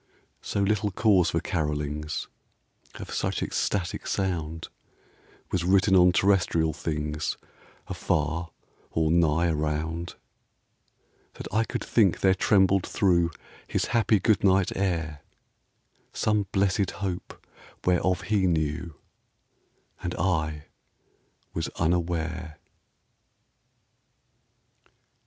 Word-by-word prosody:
So 100 - -2
little 105 +1 +1
cause 95 -3 +3
for 80 - 0
carolings 75 -2 -3 0.7
Of - - -8
such - - -1
ecstatic 90 -4 -2
sound 80 -4 -2 0.8
Was 90 - 0
written 95 +2 +4
on 90 -1 +6
terrestrial 90 -4 +2
things 75 0 -3 0.5
Afar 80 +2 -1 0.4
or 80 -1 +1
nigh 85 0 +3
around, 80 +2 -2 1.2
That - - -7
I 110 +1 +3
could - - -4
think 100 -7 +3
there 95 -1 +5
trembled 95 0 +3
through 85 -4 +2 0.4
His - - 0
happy 110 -3 +3
good 105 +1 +2
night 95 -1 +3
air 80 -6 -2 0.9
Some 105 -2 +1
blessed 95 -1 +1 0.2
Hope, 90 -2 -5 0.5
whereof 90 +1 +2
he 100 -2 +1
knew, 80 0 -1 1.1
And 90 -1 -3
I 80 -4 -1 0.9
was - - -2
unaware. 85 -1 -1
85 Hz, 95 wpm, -26 LUFS, 80-95 Hz, 1.2 s, on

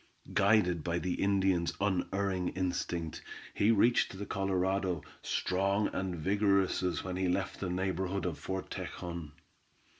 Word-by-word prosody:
Guided 95 -5 +3
by 85 0 0
the 90 +1 -1
Indian's 95 -3 +2
unerring 95 -1 0
instinct, 90 -3 -2 0.3
he 100 - +3
reached 115 -2 +3
the 100 - -4
Colorado, 95 -3 0 0.2
strong 100 +3 +1
and 95 -1 -2
vigorous 100 +3 +2
as 90 -1 -1
when 90 -1 -3
he 95 0 +1
left 95 +2 -1
the 95 - -2
neighborhood 95 0 -1
of 85 -4 -2
Fort 95 0 -4
Tejon. 85 -4 -5
95 Hz, 130 wpm, -32 LUFS, 90-100 Hz, 0.3 s, Guided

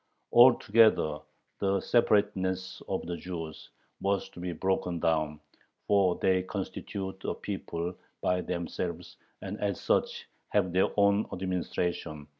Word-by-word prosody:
Altogether 115 -9 +6 0.4
the 100 0 +1
separateness 95 -5 +1
of - - -2
the 85 +1 -3
Jews 80 -3 -7 0.3
was 100 0 0
to - - -13
be 90 0 -3
broken 90 0 -1
down, 80 -2 0 0.5
for 95 -3 +3
"they 95 -1 +2
constitute 95 +1 -5
a - - -2
people 90 -3 -4 0.3
by 90 0 +1
themselves, 85 0 -4 0.3
and 100 +2 -5
as 100 -3 -1
such - - 0 0.2
have 95 -4 +1
their 95 - +4
own 100 +1 +4
administration 90 -4 -3
95 Hz, 120 wpm, -29 LUFS, 85-100 Hz, 0.5 s, Altogether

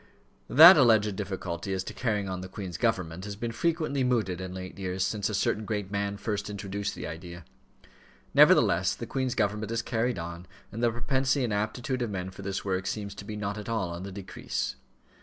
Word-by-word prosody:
That 165 +6 +10
alleged 110 -6 +4
difficulty 95 -2 -4
as 95 - -2
to - - -7
carrying 105 -5 -1
on 95 -1 -4
the 95 - -7
Queen's 90 -3 -6
government 95 -7 0
has 105 -1 -5
been 115 +3 -3
frequently 155 -1 0
mooted 110 -8 0
in 95 -1 -5
late 95 +1 -7
years 95 0 -1
since 105 0 -1
a 105 - -2
certain 105 +2 0
great 105 -2 -3
man 100 0 -1
first 105 0 -3
introduced 100 0 -4
the - - -6
idea. 85 +1 -8 0.9
Nevertheless, 95 +3 +5
the 120 - -6
Queen's 130 +1 -2
government 105 0 0
is 115 0 -1
carried 120 0 0
on, 85 +1 -6 0.2
and 115 - -5
the 120 - +4
propensity 130 +3 0
and 115 -4 -1
aptitude 120 +5 -2
of 120 - -1
men 95 -2 -4
for 95 - -11
this 100 0 -4
work 95 -1 -1
seems 100 0 -3
to 100 - -9
be 105 - -5
not 105 0 -3
at 105 - -7
all 105 -7 -1
on 85 +1 -6
the 100 +1 -6
decrease. 95 0 -4
100 Hz, 205 wpm, -28 LUFS, 95-115 Hz, 0.9 s, That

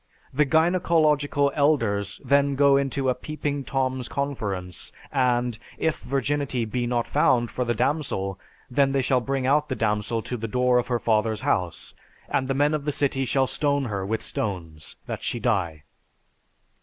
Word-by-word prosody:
The 150 +2 +2
gynecological 155 -4 +3
elders 115 -10 +1
then 140 0 +3
go 140 0 +5
into 135 -1 0
a 130 - +3
"peeping 145 +1 -4
Tom's" 130 -2 -1
conference 100 -11 -3 0.2
and 125 -4 +1 0.2
"If 160 -1 0
virginity 135 -2 -1
be 120 +2 -2
not 120 -1 0
found 120 -2 +2
for 125 - -1
the 120 0 0
damsel: 120 -7 -1 0.3
Then 135 +2 +2
they 135 -1 +2
shall 130 -1 +2
bring 135 +1 -2
out 150 +3 +2
the 130 - -1
damsel 105 0 -1
to 125 - -4
the 115 0 -4
door 125 +2 +3
of 120 - -2
her 120 - +1
father's 110 -1 +1
house, 90 -2 -1 0.4
and 130 - 0
the 135 - 0
men 145 +2 +2
of 150 -2 -2
the 150 - +1
city 135 -2 0
shall 135 +2 +2
stone 140 +1 0
her 100 -5 -3
with 110 +3 -2
stones 85 -7 -4
that - - -5
she - - -2
die." 80 -5 -1
130 Hz, 170 wpm, -25 LUFS, 115-140 Hz, 0.4 s, go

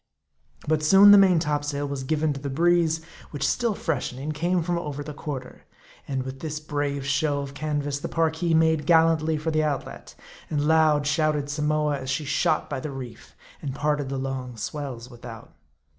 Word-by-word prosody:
But 155 0 +2
soon 195 +6 +7
the 205 - +10
main 190 -3 +5
topsail 145 -2 -1
was 140 -1 -4
given 155 +2 0
to 140 - -7
the 140 0 -5
breeze, 165 +2 +2 0.3
which 140 -2 -2
still 235 -4 0
freshening, 140 -3 -3
came 170 +3 0
from 175 +1 -1
over 145 -3 -5
the 150 +1 -7
quarter. 140 -4 -7 0.4
And 135 -2 -2
with 130 0 -7
this 155 0 -4
brave 145 -2 -3
show 145 0 +1
of 140 0 -7
canvas, 145 -1 -2
the - - -4
Parki 165 +1 +1
made 160 -2 +2
gallantly 160 -1 +4
for 155 +2 -2
the 155 0 +1
outlet; 145 -3 -4 0.3
and 150 -2 0
loud 155 -2 +4
shouted 150 -1 0
Samoa 150 -1 0
as 130 0 -6
she 140 +3 -1
shot 140 +1 +1
by 140 - -4
the 150 - -5
reef, 125 -4 -9 0.3
and 135 -2 -4
parted 145 -1 -1
the 135 - -3
long 130 -2 -4
swells 130 -2 -5
without. 120 -2 -11
150 Hz, 180 wpm, -25 LUFS, 140-160 Hz, 0.4 s, the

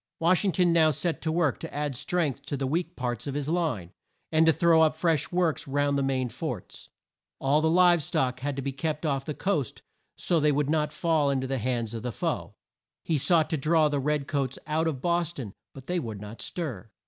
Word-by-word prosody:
Wash 175 +3 +3
ing 195 - +2
ton 175 0 +3
now 160 -2 +5
set 160 +3 -1
to 160 - -1
work 160 -5 +1
to - - -7
add 145 -2 -2
strength 155 0 -1
to 140 - -2
the 135 - -2
weak 165 +6 -1
parts 120 0 -3
of 140 - -3
his 145 -1 -2
line, 155 - -1 0.4
and 160 0 +4
to - - +8
throw 165 0 +4
up 155 -1 +4
fresh 160 -2 0
works 175 -5 0
round 145 +1 +1
the 140 - +1
main 130 -2 0
forts. 115 - -6 0.5
All 140 +3 +2
the 160 - +2
live 175 0 +5
stock 135 -6 -1
had 140 +1 -3
to 135 - -4
be 140 - -2
kept 155 +3 -3
off 135 -3 0
the 150 - -4
coast 155 - -2 0.3
so 170 - +1
that - - -1
they 150 0 +4
would 145 0 +1
not 150 -1 +1
fall 160 -4 +1
in 135 -1 +1
to - - -3
the 135 0 -2
hands 120 -1 -2
of 115 - -4
the 125 - -3
foe. - - -3 0.5
He 160 -3 0
sought 160 +2 +3
to 160 - +1
draw 155 +2 +3
the 145 -1 0
red 150 +1 0
coats 135 -3 -1
out 160 +1 0
of 140 -5 -3
Bos 170 -1 +1
ton, 115 - -7 0.2
but 135 -1 -12
they 180 +3 -1
would 110 -8 -5
not 105 +3 -9
stir. 120 - -5
150 Hz, 235 wpm, -27 LUFS, 135-165 Hz, 0.5 s, to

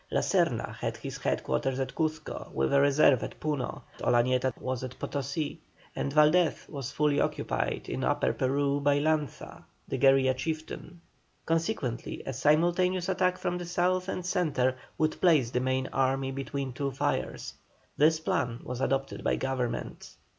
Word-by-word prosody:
La - - +1
Serna - - +1
had - - -3
his - - -7
head - - -1
quarters 130 - -1
at 130 -1 -2
Cuzco 155 -1 -3
with 65 0 +1
a 140 - +6
reserve 140 -2 +5
at - - -6
Puno. 150 -5 -3 0.2
Olañeto 125 +2 +2
was 130 -1 -3
at 130 -1 -6
Potosí, 140 +2 -3 0.4
and 140 - -2
Valdés 155 +3 +3
was 140 -5 -5
fully 150 -1 +2
occupied - - -1
in - - -3
Upper - - +1
Peru 140 +2 +1
by 145 0 +3
Lanza 150 -2 -1 0.2
the - - -3
guerilla 135 -1 +5
chieftain. 160 +4 -5 0.4
Consequently, 165 - -2
a 135 - -3
simultaneous 175 +6 +2
attack 185 -1 +1
from 180 0 -2
the 175 - -5
South 180 +1 +1
and 185 -2 -3
Centre 155 -9 +1 0.2
would 155 0 0
place 150 -10 +4
the 125 - +1
main 130 +1 0
army 135 0 +1
between 135 -1 -4
two 140 +2 -2
fires. 135 +2 -2 0.4
This 155 +2 +4
plan 120 -6 -1
was 125 0 -5
adopted 135 +1 -1
by - - +2
Government. 130 -2 -3
140 Hz, 155 wpm, -29 LUFS, 130-160 Hz, 0.4 s, a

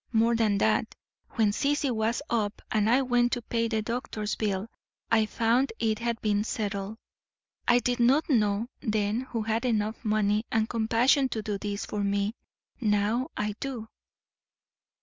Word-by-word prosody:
More 230 0 +3
than 215 -3 +2
that; - - +1 0.4
when 220 -3 +3
Sissy 285 +4 0
was 225 +4 0
up 215 -3 -1
and 215 0 +2
I 255 +3 +4
went 245 -1 +2
to 245 - -1
pay 230 0 0
the 220 -1 -1
doctor's 215 -2 -3
bill 200 -1 -1 0.4
I 220 -1 +4
found 235 +5 +1
it 220 -1 0
had 235 -1 -2
been 210 -1 +1
settled. 205 -2 -3 0.7
I 240 - +6
did 245 0 0
not 260 +6 +4
know 215 -4 +2
then 215 -1 0
who 230 -2 -2
had 225 +1 -1
enough 220 -2 -1
money 210 -1 +1
and 220 0 +2
compassion 240 +5 +2
to 220 -3 -3
do 205 -1 -3
this 205 0 -3
for 205 -1 -3
me; 200 +1 0 0.5
now 215 +2 +1
I 210 0 -1
do." 245 -5 -5
220 Hz, 160 wpm, -28 LUFS, 210-240 Hz, 0.7 s, I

